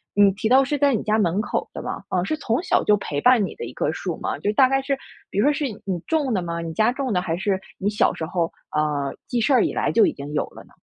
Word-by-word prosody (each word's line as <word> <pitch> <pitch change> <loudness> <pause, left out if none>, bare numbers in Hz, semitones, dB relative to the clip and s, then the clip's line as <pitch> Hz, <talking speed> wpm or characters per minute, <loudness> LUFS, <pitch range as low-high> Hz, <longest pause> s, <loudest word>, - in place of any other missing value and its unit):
嗯， 205 - +6
你 195 - +5
提 220 +2 -2
到 265 +2 +7
是 285 +2 0
在 280 -1 +3
你 215 - 0
家 215 0 +1
门 190 -1 +1
口 220 - -2
的 - - -6
吗？ - - -5
嗯， 180 -1 0
是 310 - -1
从 270 -1 -1
小 - - +1
就 210 - +4
陪 145 -7 -3
伴 245 -5 +5
你 - - -7
的 465 - -7
一 - - -6
棵 - - -1
树 - - -4
吗？ - - -3
就 205 - 0
大 260 +4 +5
概 270 +1 +1
是 275 0 -1 0.3
比 - - -7
如 245 - +4
说 295 - +4
是 295 - -3 0.2
你 190 -2 -1
种 295 -7 0
的 190 - +1
吗？ 170 -1 -4
你 165 -1 -5
家 215 +7 +3
种 260 -4 -2
的， 180 - +2
还 170 -2 -2
是 190 0 0 0.2
你 200 +1 0
小 210 - +2
时 160 - -4
候 170 0 -1 0.2
呃， 145 -2 0
记 245 - -1
事 265 +5 +2
儿 - - +5
以 - - -1
来 - - 0
就 435 - +5
已 325 - +2
经 145 - -8
有 150 - 0
了 - - -13
呢？ - - -23
210 Hz, 325 characters per minute, -23 LUFS, 175-265 Hz, 0.3 s, 到